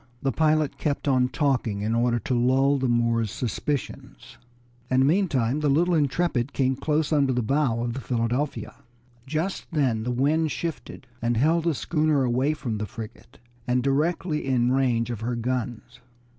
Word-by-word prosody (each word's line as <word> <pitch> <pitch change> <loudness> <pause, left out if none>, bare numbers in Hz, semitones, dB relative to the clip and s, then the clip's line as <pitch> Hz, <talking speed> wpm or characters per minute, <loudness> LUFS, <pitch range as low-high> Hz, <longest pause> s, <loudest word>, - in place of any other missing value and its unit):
The 135 - +1
pilot 155 -1 +1
kept 145 -1 -2
on 130 -2 +3
talking 125 -9 0
in 110 +2 -1
order 120 +1 +2
to 120 +3 -3
lull 135 +3 +3
the 130 -1 0
Moors' 115 -2 +1
suspicions, 125 - -5 0.5
and 130 +1 +3
meantime 145 - +1
the 150 -1 +1
little 170 +6 +3
Intrepid 145 -3 0
came 130 -1 +1
close 150 +3 0
under 140 -3 +3
the 125 -1 0
port 135 +7 +1
bow 115 +1 -2
of 120 -1 -2
the 135 - -5
Philadelphia. 125 +4 -2 0.5
Just 160 +7 -2
then 130 -8 +1
the 120 - -3
wind 150 +6 +1
shifted 165 +1 -5 0.2
and 120 0 0
held 160 +6 +2
the 165 -3 +1
schooner 155 -2 +1
away 130 +5 +1
from 115 -8 -4
the 105 - -3
frigate, 110 +3 -10 0.3
and 125 0 +1
directly 150 +3 0
in 125 -2 +1
range 120 -3 +1
of 115 - -5
her 120 +2 -2
guns. 120 0 -4
130 Hz, 170 wpm, -25 LUFS, 120-150 Hz, 0.5 s, on